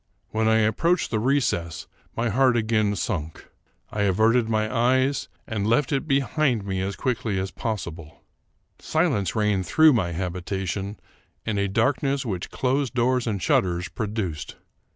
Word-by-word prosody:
When 110 0 +1
I 110 - +4
approached 165 +11 +1
the 110 - +1
recess, 105 - 0 0.3
my 115 +1 +1
heart 125 +2 +3
again 110 -2 +1
sunk. 80 -4 -4 0.4
I 105 - -2
averted 110 +4 +3
my 110 +2 0
eyes, 130 +3 +2 0.2
and 105 -3 -2
left 125 +5 +2
it 140 +2 -1
behind 135 -5 +1
me 95 -1 -2
as 100 +1 -2
quickly 120 -6 -1
as 95 0 -2
pos 110 -3 -3
sible. 80 -2 -10 0.6
Silence 145 - 0
reigned 105 -4 +1
through 155 - +6
my 95 -8 0
habitation, 95 +3 -3 0.5
and 105 -3 -1
a 100 0 0
dark 115 +7 +1
ness 140 -1 0
which 95 -6 -3
closed 135 0 -1
doors 125 0 +1
and 100 -4 -2
shutters 90 -1 +1
produced. 100 -8 -4
110 Hz, 150 wpm, -24 LUFS, 95-130 Hz, 0.6 s, through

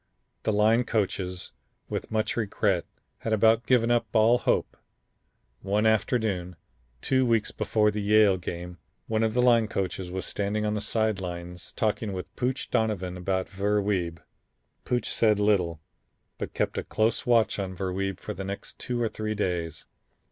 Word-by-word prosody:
The - - 0
line 110 +3 +4
coaches, 95 -5 -2 0.4
with - - -4
much 110 0 0
regret, 100 -5 0 0.3
had 110 - -2
about 110 +2 +4
given 120 -2 +4
up 120 -1 +2
all 115 +2 +5
hope. - - 0 0.9
One 105 +3 +1
afternoon, 105 -5 +1 0.5
two 130 -1 +2
weeks 115 -3 +2
before 105 0 +1
the 105 0 -3
Yale 105 -1 +5
game, 90 0 -6 0.3
one 110 0 0
of 110 0 +1
the 125 - +3
line 115 -3 +5
coaches 95 -3 -3
was 95 +1 -4
standing 105 +1 -1
on 105 - 0
the 105 - -2
side 110 -2 0
lines 90 0 -6
talking 105 -1 -1
with 90 -1 -7
Pooch 130 +2 -2
Donovan 100 -5 0
about 95 +1 -1
Ver 100 +2 0
Wiebe. 90 -5 -1 0.7
Pooch 125 -1 0
said 105 -3 +3
little, 95 -6 +2 0.6
but - - -5
kept - - 0
a - - -3
close 110 +3 0
watch 115 -3 +3
on 95 -1 -3
Ver 95 0 -3
Wiebe 95 0 -2
for - - -5
the 95 - -6
next 100 +1 -6
two 125 -1 -2
or 115 - +2
three 110 0 -3
days. 85 -6 -2
105 Hz, 165 wpm, -27 LUFS, 95-110 Hz, 0.9 s, all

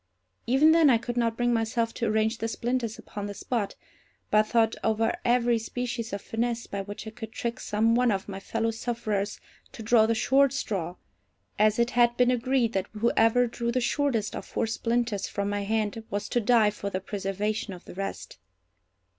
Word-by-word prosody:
Even 270 +6 +5
then 325 -2 +6
I 240 - +5
could 240 +1 -5
not 230 -2 0
bring 240 0 +2
myself 230 0 0
to 230 - -2
arrange 220 +1 +1
the 225 - -1
splinters 235 -1 -2
upon 205 -1 -7
the 205 - -6
spot, 225 -3 -2 0.6
but 215 0 +4
thought 225 -1 +2
over 225 +1 +1
every 240 -1 +3
species 235 0 -4
of 200 0 -5
finesse 235 +1 -2
by 200 - -4
which 205 +2 -8
I 220 - -6
could 220 -1 -8
trick 235 +2 -4
some 220 +2 +1
one 245 +1 +3
of 195 -3 -1
my 195 -1 -6
fellow 225 +3 -1
sufferers 215 -3 -3 0.3
to 225 - -8
draw 220 0 +4
the 230 - +1
short 270 +4 +3
straw, 185 -10 -3 0.6
as 215 0 +4
it 235 +1 +2
had 240 -1 +3
been 250 0 +4
agreed 250 -1 +1
that 190 0 -1
whoever 225 +2 +3
drew 235 0 -3
the 255 - +1
shortest 240 -3 0
of - - -5
four - - -2
splinters 230 -2 -1
from 200 0 -2
my 205 0 -1
hand 220 +1 -1
was 205 +1 -3
to 240 - +1
die 220 -1 +4
for 200 -1 -5
the 185 - -2
preservation 200 +2 -3
of 180 -2 -10
the - - -10
rest. 195 +2 -6
225 Hz, 195 wpm, -27 LUFS, 210-240 Hz, 0.6 s, then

